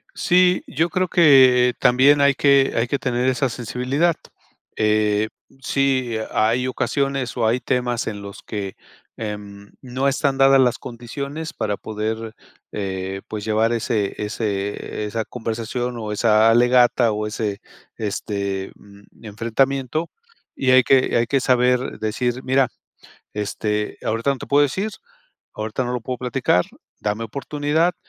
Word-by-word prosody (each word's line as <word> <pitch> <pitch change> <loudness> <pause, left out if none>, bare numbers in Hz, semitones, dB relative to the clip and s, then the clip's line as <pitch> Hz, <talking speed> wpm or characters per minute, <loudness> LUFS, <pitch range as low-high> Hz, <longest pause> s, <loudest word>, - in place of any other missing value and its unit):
Sí, 180 0 +3
yo 165 +4 0
creo 185 +2 0
que 130 -7 +6
también 135 +3 +5
hay 140 0 +5
que 140 0 +3
hay 115 +1 +1
que 140 - 0
tener 125 +1 -1
esa 130 0 0
sensibilidad. 130 +8 -1 0.6
Eh, 105 0 +1 0.3
sí 130 -2 0 0.2
hay 115 +4 +1
ocasiones 135 -1 -1
o 115 - +1
hay 120 +3 +2
temas 125 -2 -1
en 105 -2 -4
los 100 0 -9
que, 100 -3 -5 0.4
em, 100 -2 -7
no 130 +1 -2
están 140 0 +1
dadas 135 0 +6
las 125 -2 +3
condiciones 140 +6 -6
para 105 -1 -2
poder, 110 +1 -4 0.4
eh, 95 -1 -4
pues, 105 -2 -6
llevar 110 +2 +1
ese 110 -3 -1
ese 105 -1 -3
esa 110 +1 -2
conversación 120 +2 -4
o 110 -2 -5
esa 110 +1 +4
alegata 120 0 +4
o 105 0 -2
ese, 105 -2 -3 0.4
este, 100 -2 -3
mm, 100 +2 -19
enfrentamiento, 130 +8 -1 0.5
y 130 -1 +1
hay 130 0 +6
que 130 +1 +3
hay 115 0 +2
que 135 +3 +2
saber 125 0 +1
decir: 120 +3 -2
"Mira, 130 -1 +2 0.7
este, 105 0 -2
ahorita 115 +5 0
no 135 - -1
te - - -8
puedo 145 +1 +4
decir, 190 +10 -1 0.6
ahorita 110 +4 -3
no 125 - -3
lo 125 - -2
puedo 125 +1 -4
platicar, 125 -7 +1 0.3
dame 105 +2 -2
oportunidad". 150 +7 -1
120 Hz, 140 wpm, -21 LUFS, 110-135 Hz, 0.7 s, que